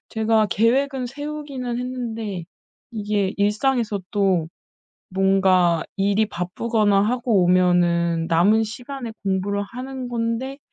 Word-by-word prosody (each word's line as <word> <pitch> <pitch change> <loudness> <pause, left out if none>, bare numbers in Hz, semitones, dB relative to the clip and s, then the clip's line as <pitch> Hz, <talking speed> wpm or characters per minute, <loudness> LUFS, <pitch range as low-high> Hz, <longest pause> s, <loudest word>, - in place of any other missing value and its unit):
제가 220 -1 +2
계획은 255 +5 +1
세우기는 280 -3 -5
했는데 230 -7 -4 0.5
이게 210 -3 -1
일상에서 210 +1 +1
또 190 -6 +1 0.6
뭔가 185 -3 +3
일이 200 +2 +2
바쁘거나 205 +3 +1
하고 235 -2 +1
오면은 175 -2 +2
남은 190 +7 +4
시간에 240 +2 -7
공부를 195 +1 0
하는 255 +4 -7
건데 240 +3 -2
215 Hz, 245 characters per minute, -22 LUFS, 190-245 Hz, 0.6 s, 남은